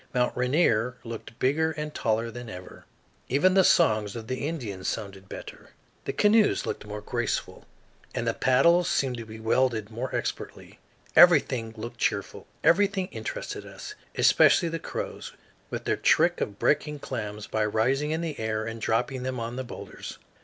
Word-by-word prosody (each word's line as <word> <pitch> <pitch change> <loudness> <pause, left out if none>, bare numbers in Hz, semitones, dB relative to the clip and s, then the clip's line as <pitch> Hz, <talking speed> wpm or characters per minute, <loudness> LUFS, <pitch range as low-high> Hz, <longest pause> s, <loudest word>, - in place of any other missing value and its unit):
Mt. 125 0 +1
Rainier 125 -3 +2
looked 115 0 -8
bigger 160 +5 +1
and 150 0 -5
taller 115 -2 0
than 120 0 -8
ever. 90 -2 -10 0.4
Even 145 +8 +4
the 190 0 +6
songs 110 - +3
of 115 -2 -6
the 130 +4 -3
Indians 110 - -5
sounded 100 -3 -5
better; - - -9 0.4
the - - -1
canoes 210 0 +3
looked - - -4
more 105 0 -6
graceful, 120 +2 -3 0.5
and - - -2
the - - +2
paddles 170 +7 +4
seemed 130 -3 0
to 115 -1 -7
be 110 0 -9
wielded 110 -1 +1
more 120 +4 -4
expertly. - - -5 0.4
Everything 115 -3 +6
looked 120 +2 -7
cheerful; - - -2 0.2
everything 195 +1 +3
interested - - -5
us, 420 - -9 0.2
especially 170 - +5
the 165 0 -3
crows, - - -6 0.4
with - - -4
their - - 0
trick - - +3
of 100 - -3
breaking 150 +4 +1
clams 105 -6 -5
by 110 - -1
rising 125 +8 +1
in 160 +2 -1
the 160 -4 -4
air 110 0 -1
and 115 0 -6
dropping 125 +4 0
them 130 -1 -3
on 115 +1 -4
the 130 - -3
boulders. 120 - -9
125 Hz, 165 wpm, -27 LUFS, 110-150 Hz, 0.5 s, the